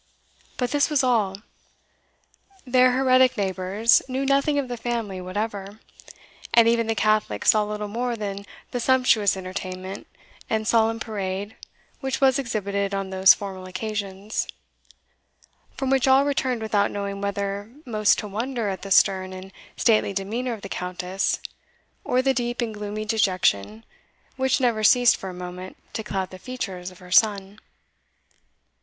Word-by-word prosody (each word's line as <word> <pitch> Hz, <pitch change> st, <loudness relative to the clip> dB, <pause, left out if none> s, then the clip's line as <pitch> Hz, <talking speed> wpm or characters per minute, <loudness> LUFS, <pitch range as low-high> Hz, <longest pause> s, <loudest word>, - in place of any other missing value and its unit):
But 250 Hz, -1 st, -1 dB
this 290 Hz, +1 st, +2 dB
was 295 Hz, -3 st, +2 dB
all; 210 Hz, -5 st, +1 dB, 1.2 s
their 255 Hz, 0 st, +4 dB
heretic 255 Hz, -1 st, +4 dB
neighbours 195 Hz, +3 st, +2 dB
knew 265 Hz, +1 st, -2 dB
nothing 280 Hz, +2 st, +2 dB
of 280 Hz, -2 st, 0 dB
the 245 Hz, -, -4 dB
family 225 Hz, -5 st, -3 dB
whatever; 200 Hz, +2 st, -4 dB, 0.8 s
and 230 Hz, -1 st, +7 dB
even 230 Hz, -1 st, +2 dB
the 225 Hz, -, 0 dB
Catholics 215 Hz, -, +2 dB
saw 215 Hz, -1 st, +2 dB
little 210 Hz, 0 st, -4 dB
more 240 Hz, +3 st, -2 dB
than 200 Hz, -2 st, -5 dB, 0.2 s
the 245 Hz, -, -2 dB
sumptuous 235 Hz, -6 st, +3 dB
entertainment 185 Hz, 0 st, -6 dB, 0.4 s
and 220 Hz, -1 st, -1 dB
solemn 225 Hz, 0 st, +2 dB
parade 200 Hz, -1 st, -4 dB, 0.4 s
which 265 Hz, -2 st, -2 dB
was 270 Hz, 0 st, +4 dB
exhibited 200 Hz, -5 st, -2 dB
on 195 Hz, -1 st, -3 dB
those 190 Hz, -1 st, +7 dB
formal 190 Hz, -1 st, -7 dB
occasions, 200 Hz, +1 st, -4 dB, 1.3 s
from 270 Hz, -1 st, -1 dB
which 270 Hz, -1 st, +3 dB
all 265 Hz, +1 st, +5 dB
returned 260 Hz, -5 st, -1 dB
without 205 Hz, -2 st, +1 dB
knowing 200 Hz, -1 st, -4 dB
whether 200 Hz, +1 st, -3 dB
most 215 Hz, -4 st, +2 dB
to 210 Hz, -, -4 dB
wonder 230 Hz, +2 st, -2 dB
at 190 Hz, -, -4 dB
the 195 Hz, -, -7 dB
stern 190 Hz, -1 st, +3 dB
and 185 Hz, +1 st, -9 dB, 0.3 s
stately 215 Hz, -3 st, +2 dB
demeanour 225 Hz, +6 st, -2 dB
of 215 Hz, -, -9 dB
the -, -, -5 dB
Countess, 180 Hz, +1 st, -2 dB, 0.6 s
or 255 Hz, +1 st, +1 dB
the 270 Hz, 0 st, +3 dB
deep 240 Hz, -1 st, -2 dB
and 235 Hz, -3 st, -2 dB
gloomy 210 Hz, +1 st, -5 dB
dejection 185 Hz, -, +1 dB, 0.5 s
which 265 Hz, +1 st, +1 dB
never 235 Hz, -4 st, +1 dB
ceased 245 Hz, +2 st, +6 dB
for 190 Hz, -, -7 dB
a -, -, -7 dB
moment 180 Hz, +1 st, -8 dB, 0.2 s
to -, -, -3 dB
cloud 190 Hz, -3 st, -3 dB
the 185 Hz, -, -10 dB
features 190 Hz, -8 st, -5 dB
of 185 Hz, -, -16 dB
her 180 Hz, 0 st, -14 dB
son. 200 Hz, 0 st, +3 dB
210 Hz, 150 wpm, -24 LUFS, 195-240 Hz, 1.3 s, and